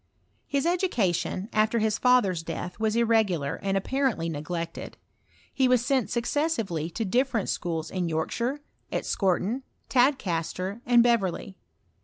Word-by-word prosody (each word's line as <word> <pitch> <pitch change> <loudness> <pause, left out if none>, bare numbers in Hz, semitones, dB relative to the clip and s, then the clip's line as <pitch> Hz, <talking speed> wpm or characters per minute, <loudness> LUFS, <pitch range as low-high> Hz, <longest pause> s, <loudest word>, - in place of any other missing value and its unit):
His 280 0 0
education, 235 - 0
after 215 +2 +2
his 220 -1 +1
father's 245 -9 +3
death, 170 +3 -6
was 220 0 +1
irregulax. 215 -11 +1
And 195 0 0
apparently 245 -6 0
neglected; 165 +2 -5 0.6
he 265 -2 +3
was 250 -1 +3
sent 265 -4 +1
successively 235 - -1
to 225 +5 -3
different 240 0 +1
schools 165 -2 -2
in 180 -3 -1
Yorkshire, 235 - -2 0.3
at - - -1
Scorton, 195 +6 0 0.3
Tad 265 +2 +4
caster, 185 +3 -3
and 240 -1 +6
Beverley. 200 -5 0
215 Hz, 130 wpm, -27 LUFS, 175-250 Hz, 0.6 s, and